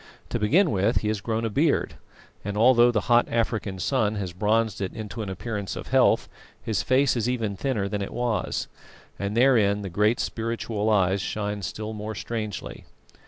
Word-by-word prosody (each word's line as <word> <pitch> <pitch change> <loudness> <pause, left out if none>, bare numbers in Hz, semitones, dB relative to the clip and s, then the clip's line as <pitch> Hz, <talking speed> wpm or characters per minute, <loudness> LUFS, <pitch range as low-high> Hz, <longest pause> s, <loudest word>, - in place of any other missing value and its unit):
To 120 - -2
begin 155 - +3
with, 100 +5 +1
he 105 - -1
has 105 -2 -2
grown 115 +1 -1
a - - 0
beard, 145 +6 +1 0.5
and 100 +1 -4
although 120 +1 +6
the 110 -3 +1
hot 120 0 +3
African 110 -4 -1
sun 110 +1 0
has 95 -4 -4
bronzed 110 +2 0
it 95 - -3
into 110 +1 -6
an 105 - -4
appearance 100 +1 -4
of - - -7
health, - - +3 0.3
his 110 -3 -1
face 130 +1 +2
is 120 0 0
even 115 -5 -1
thinner 110 -3 -1
than 100 +1 -3
it 100 - -4
was, 120 -2 -1 0.5
and 100 +2 -2
therein 110 -6 +4
the 95 - -4
great 105 +6 +2
spiritual 115 -2 -2
eyes 95 -2 +2
shine 105 0 -3
still 110 +3 -5
more 105 +1 -5
strangely. 110 0 -5
110 Hz, 180 wpm, -25 LUFS, 100-120 Hz, 0.5 s, although